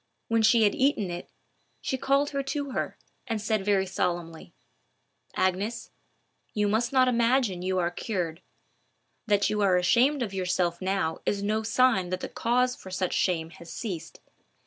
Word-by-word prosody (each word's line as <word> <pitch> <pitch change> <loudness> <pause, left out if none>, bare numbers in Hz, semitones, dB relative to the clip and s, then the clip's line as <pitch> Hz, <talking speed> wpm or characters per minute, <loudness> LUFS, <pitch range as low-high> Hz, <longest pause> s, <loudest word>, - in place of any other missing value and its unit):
When 230 0 +3
she 220 +1 +5
had 205 - +4
eaten 260 -9 +1
it, 175 0 -6 0.5
she - - -2
called 275 +2 +1
her 280 -1 -1
to 280 0 -3
her, - - -3 0.3
and 225 -3 -1
said 215 -1 0
very 195 -1 +2
solemnly,— 175 - -3 0.8
"Agnes, 195 +5 -1 0.6
you 210 -1 +2
must 225 +3 +1
not 260 -1 +4
imagine 235 -5 +2
you 185 +1 -1
are 175 -1 +1
cured. 175 -5 -3 0.9
That 205 -2 +2
you 210 0 0
are 190 -3 +4
ashamed 255 +9 +3
of 205 -4 -5
yourself 180 -2 0
now 185 -4 -1
is 200 -1 0
no 215 +2 0
sign 225 -5 +2
that 185 0 -3
the - - -4
cause 250 +2 +1
for 190 - -11
such 185 -1 -2
shame 165 -3 0
has 170 -1 -12
ceased. 170 -6 -6
205 Hz, 165 wpm, -27 LUFS, 180-235 Hz, 0.9 s, she